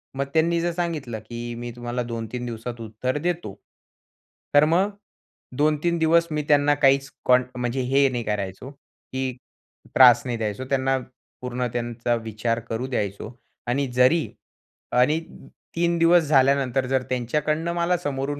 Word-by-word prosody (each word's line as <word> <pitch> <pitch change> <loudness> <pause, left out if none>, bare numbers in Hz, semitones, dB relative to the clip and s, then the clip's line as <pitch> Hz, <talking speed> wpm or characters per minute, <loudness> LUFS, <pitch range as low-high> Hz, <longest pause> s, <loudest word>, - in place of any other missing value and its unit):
मग, 140 - -1
त्यांनी 165 +1 +2
जर 175 0 0
सांगितलं, 155 -10 -3
की 120 +2 -7
"मी, 120 0 -6
तुम्हाला 120 0 -3
2-3 115 +1 -5
दिवसात 115 0 -6
उत्तर 115 +5 -3
देतो." 170 - -2 1.0
तर 145 +1 +7
मग 180 +6 +2 0.7
2-3 155 +3 +1
दिवस 165 +1 +3
मी 150 - 0
त्यांना 145 0 +4
काहीच 135 -1 +3
कॉन्ट 125 0 +4
म्हणजे, 125 +1 -1
हे 135 +2 +3
नाही 120 -2 -3
करायचो, 105 +5 -4
की 130 -2 -6 0.6
त्रास 125 -2 +8
नाही 120 -2 -2
द्यायचो. 110 +3 -3
त्यांना 135 -1 +1 0.4
पूर्ण 125 0 -2
त्यांचा 120 0 -1
विचार 115 +1 -2
करू 115 +3 -2
द्यायचो 105 -2 -3 0.4
आणि 135 +3 0
जरी 130 +6 +4 1.5
3 170 0 +1
दिवस 170 0 +5
झाल्यानंतर, 135 -2 +2
जर 130 0 +1
त्यांच्याकडनं 150 +7 -1
मला 175 +1 +1
समोरून 145 -2 -3
130 Hz, 135 wpm, -24 LUFS, 120-150 Hz, 1.5 s, त्रास